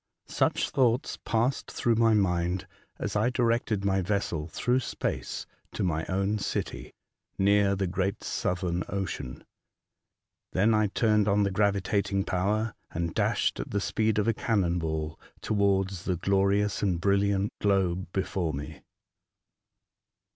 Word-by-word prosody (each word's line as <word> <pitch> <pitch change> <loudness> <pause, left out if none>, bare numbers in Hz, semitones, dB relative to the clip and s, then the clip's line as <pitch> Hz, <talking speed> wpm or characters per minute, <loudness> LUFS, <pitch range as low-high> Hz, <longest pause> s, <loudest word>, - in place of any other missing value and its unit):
Such - - 0
thoughts 125 -2 +1
passed 120 +4 0
through 120 - +1
my 115 -1 +4
mind 90 -2 +1 0.3
as - - -4
I 110 +4 +3
directed 115 -5 0
my 95 -1 +2
vessel 90 -5 -1
through 125 +9 +1
space 130 - -3 0.3
to - - -2
my 80 -3 -1
own 100 +3 0
city, - - -3 0.5
near 100 0 +3
the 95 0 -1
great 95 +3 -2
Southern 90 -1 -1
Ocean. 90 -9 -4 1.1
Then 105 +5 +3
I 110 -1 +3
turned 105 0 +2
on 105 0 +3
the 100 - 0
gravitating 100 0 +1
power, 105 +5 0 0.2
and 85 -1 -3
dashed, - - +1
at - - -4
the 100 - 0
speed 110 +1 0
of 105 0 +1
a 115 - +3
cannon 95 -6 +1
ball, 80 -1 -3 0.2
towards 100 -3 0
the 90 - +1
glorious 100 +3 +1
and 90 -4 +1
brilHant 100 +1 +2
globe 95 -3 +1
before 90 -4 -1
me. 70 +1 -7
100 Hz, 135 wpm, -28 LUFS, 90-105 Hz, 1.1 s, my